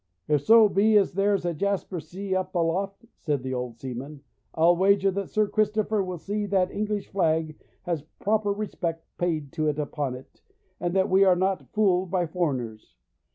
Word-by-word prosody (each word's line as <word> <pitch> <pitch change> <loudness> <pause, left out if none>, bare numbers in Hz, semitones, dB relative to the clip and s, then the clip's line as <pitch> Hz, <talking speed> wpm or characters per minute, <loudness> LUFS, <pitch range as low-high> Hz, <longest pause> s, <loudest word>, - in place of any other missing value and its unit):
'If 150 -2 +2
so 220 +7 +7
be 210 +2 +4
as 200 -1 +2
there's 195 0 +1
a 175 - 0
jasper 195 +1 -2
sea 190 +5 -5
up 185 0 -3
aloft,' 190 +5 -1
said 145 -4 -2
the 130 0 -3
old 125 -2 -4
seaman, 135 +3 -7 0.3
'I'll 170 +2 +5
wager 195 +1 +3
that 195 0 -4
Sir 215 -1 +1
Christopher 215 0 +1
will 185 -1 -5
see 205 +5 -3
that 185 -2 +2
the - - -12
English 210 -1 -2
flag 160 -4 0 0.3
has 170 -4 -2 0.2
proper 210 0 +1
respect 175 -5 -4
paid 155 -5 -1
to 155 -1 -1
it 150 -1 0
upon 145 -3 -3
it, 130 +1 -14 0.4
and 175 +1 -2
that 190 -1 +3
we 190 +1 +6
are 185 -2 +5
not 190 +1 -1
fooled 190 -4 +2
by 180 -1 +1
foreigners. 135 -10 -3
180 Hz, 185 wpm, -26 LUFS, 155-200 Hz, 0.4 s, so